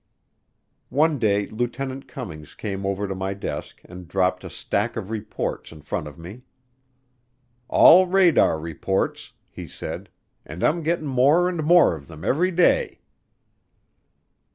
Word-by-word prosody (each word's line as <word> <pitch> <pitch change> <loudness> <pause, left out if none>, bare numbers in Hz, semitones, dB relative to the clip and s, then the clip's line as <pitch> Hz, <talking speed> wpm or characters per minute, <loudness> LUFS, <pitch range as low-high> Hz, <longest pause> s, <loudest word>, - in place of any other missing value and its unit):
One 150 +1 +2
day 105 -3 +1
Lieutenant 130 +4 -4
Cummings 85 - -9
came 100 -2 -4
over 100 +1 -2
to 95 - -3
my 95 +1 -4
desk 100 - -6
and 90 -1 -11
dropped 95 0 0
a - - -7
stack - - -2
of 100 - -5
reports 110 -1 -4
in 80 -2 -13
front 75 - -4
of 75 - -11
me. 90 +9 -10 1.3
"All 185 +3 +7
radar 180 - +4
reports," 85 +4 -3
he - - -10
said, - - -7 0.3
"and 80 +5 -8
I'm 170 +2 +2
getting 165 0 -1
more 140 +6 +3
and 175 -3 -2
more 170 - +5
of 70 -3 -12
them 80 +2 -10
every 170 +11 +2
day." 185 - +2
110 Hz, 140 wpm, -23 LUFS, -, 1.3 s, All